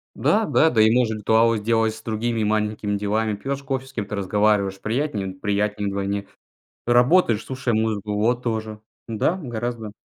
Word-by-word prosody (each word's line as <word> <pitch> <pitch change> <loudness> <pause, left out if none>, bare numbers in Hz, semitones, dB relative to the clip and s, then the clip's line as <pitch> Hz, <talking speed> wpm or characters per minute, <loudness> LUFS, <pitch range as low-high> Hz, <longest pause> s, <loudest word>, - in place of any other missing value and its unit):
Да, 220 0 +2
да. 160 - +4
Да 110 -6 +3
и 110 - +6
можно 115 -3 +2
ритуалы 110 +2 +3
сделать 110 +1 +1
с 110 - -11
другими 115 0 -2
маленькими 105 -1 -1
делами. 105 +1 -1
Пьешь 135 +6 -4
кофе- 135 -1 -3
с - - -13
кем-то 105 -3 -4
разговариваешь. 100 0 +1
Приятнее? 115 -3 -2
Приятнее 105 +1 -1
вдвойне. 100 0 -2 0.6
Работаешь, 120 - +4
слушая 130 -2 -2
музыку. 110 -2 -1
Вот, 120 +4 +1
тоже. 110 -2 -3 0.3
Да, 115 - 0
гораздо. 120 - -4
110 Hz, 155 wpm, -23 LUFS, 105-120 Hz, 0.6 s, и